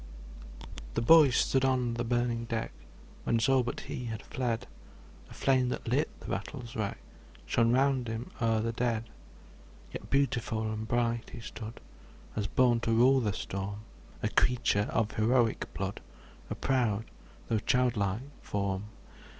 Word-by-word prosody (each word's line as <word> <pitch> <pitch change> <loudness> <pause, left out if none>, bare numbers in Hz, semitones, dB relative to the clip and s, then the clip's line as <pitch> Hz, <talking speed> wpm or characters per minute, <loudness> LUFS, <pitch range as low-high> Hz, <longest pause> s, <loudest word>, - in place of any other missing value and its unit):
] - - -12
THE - - +1
boy 155 +2 +8
stood 130 +1 +2
on 130 -3 +2
the 120 +1 -2
burning 120 -1 0
deck, 115 -1 -2 0.5
Whence 115 0 +2
all 135 -1 +5
but 120 0 -4
he 125 - -5
had 110 -2 -5
fled; 125 -5 -2 0.6
The - - -13
flame 130 -2 +2
that - - -4
lit 140 +7 +2
the - - -9
battle's 125 -5 -5
wreck, 105 -2 -2 0.5
Shone 115 0 +3
round 130 -1 +2
him 115 +2 -5
o'er 115 -1 +2
the 115 +1 -1
dead. 115 -1 -1 0.8
Yet - - -7
beautiful 120 -5 +1
and 110 0 -4
bright 120 0 0
he - - -8
stood, 115 0 -8 0.6
As 105 -2 -1
born 120 +2 +3
to 115 - -1
rule 130 +4 +5
the 110 -5 0
storm; 100 0 -4 0.4
A - - +2
creature 115 -4 +2
of 110 -1 +1
heroic 115 +1 +2
blood, 95 0 -3 0.5
A - - -3
proud 115 -5 +1 0.4
though 110 - +1
childlike 110 -4 +1 0.2
form. 100 -1 -2
115 Hz, 150 wpm, -30 LUFS, 110-125 Hz, 0.8 s, boy